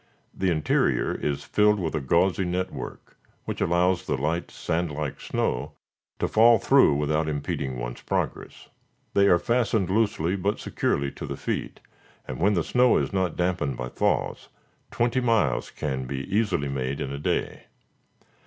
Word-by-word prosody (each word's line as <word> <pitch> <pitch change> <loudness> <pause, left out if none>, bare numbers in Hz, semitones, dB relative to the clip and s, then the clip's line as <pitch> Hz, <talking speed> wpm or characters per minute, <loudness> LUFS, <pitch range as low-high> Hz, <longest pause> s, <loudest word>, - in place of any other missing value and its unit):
The 95 - 0
interior 80 -3 +1
is 70 -1 -2
filled 105 0 +3
with 80 -4 -2
a 75 - -1
gauzy 85 +7 +2
network, 90 +1 -5 0.3
which - - -4
allows 90 +1 +2
the - - 0
light, 80 +5 -1
sand 85 +1 -2
like 75 -1 -4
snow - - -2 0.4
to - - 0
fall 115 +1 +6
through 135 - +4
without 75 +2 0
impeding 70 -3 -3
one's - - -5
progress. - - -3 0.5
They 100 0 +4
are 90 - +6
fastened 110 -3 +1
loosely 100 -5 +1
but 100 +2 -1
securely 70 0 -1
to - - -7
the - - -5
feet, - - -4 0.5
and 65 - -5
when 100 +4 +3
the 85 - +1
snow 125 +6 +4
is - - -1
not 95 -4 0
dampened 85 -7 0
by 60 0 -4
thaws, - - -1 0.4
twenty 120 +2 +1
miles 115 - +1
can 65 -3 -3
be 70 0 -4
easily 105 -10 +1
made 70 0 -3
in 70 - -3
a 70 - -5
day. - - -2
85 Hz, 160 wpm, -26 LUFS, 70-100 Hz, 0.5 s, fall